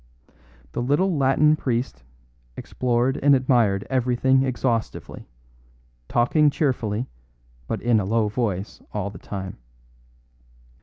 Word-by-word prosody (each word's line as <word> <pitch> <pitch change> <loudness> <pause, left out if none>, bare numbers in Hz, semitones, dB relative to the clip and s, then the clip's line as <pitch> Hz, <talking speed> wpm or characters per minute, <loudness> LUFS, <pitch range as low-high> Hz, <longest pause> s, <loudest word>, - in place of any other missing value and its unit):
The - - -3
little 150 +9 +1
Latin 145 +2 +3
priest 125 -3 -2 0.6
explored 125 +2 -1
and 140 0 +6
admired 120 -7 +2
everything 130 +1 +2
exhaustively, 125 -3 -2 0.8
talking 145 +6 +3
cheerfully 125 -6 -1 0.6
but - - -4
in 120 -2 +3
a 100 - -2
low 110 +2 +1
voice 105 -3 -3
all 100 -1 -3
the - - -11
time. 95 -6 -7
125 Hz, 105 wpm, -23 LUFS, 110-135 Hz, 0.8 s, and